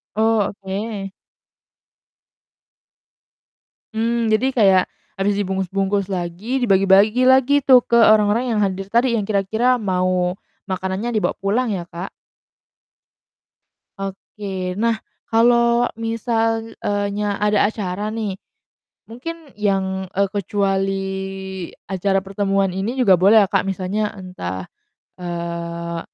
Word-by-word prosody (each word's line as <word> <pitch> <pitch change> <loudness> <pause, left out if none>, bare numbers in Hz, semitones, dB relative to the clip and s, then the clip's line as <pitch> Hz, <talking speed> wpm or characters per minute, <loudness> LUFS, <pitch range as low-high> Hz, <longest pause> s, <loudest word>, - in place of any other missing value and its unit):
Oh, 220 -1 +2
oke. 195 0 -4 2.8
Mmm, 230 0 0
jadi 225 +5 +2
kayak 195 -5 +5 0.4
habis 200 +1 +1
dibungkus-bungkus 195 0 -1
lagi, 195 +8 -3
dibagi-bagi 200 +4 +4
lagi 265 +2 +5
tuh 255 -3 +6
ke 235 - +3
orang-orang 215 +2 +4
yang 210 - +1
hadir 195 0 -2
tadi 235 +4 +2
yang 200 - -4
kira-kira 220 +5 +2
mau 185 -4 0 0.3
makanannya 190 +4 -3
dibawa 215 -2 0
pulang 210 +6 0
ya, 175 - -4
Kak? 175 +3 -6 1.9
Oke. 195 -1 -5
Nah, 230 0 +2 0.3
kalo 235 +1 +3
misal, 225 0 -1
eee, 205 0 -1
nya 205 0 -1
ada 210 -1 +3
acara 205 -1 -3
nih 210 -4 -3 0.7
mungkin 315 +5 -8
yang, 190 -2 0
e 195 - 0
kecuali 195 -1 0 0.9
acara 195 0 0
pertemuan 195 0 0
ini 195 +6 -2
juga 200 -7 +6
boleh 205 +3 +6
ya, - - 0
Kak? 195 - +2
Misalnya 195 +2 -2
entah, 95 - -6 0.5
eee, 170 -1 -4
200 Hz, 110 wpm, -20 LUFS, 190-225 Hz, 2.8 s, tuh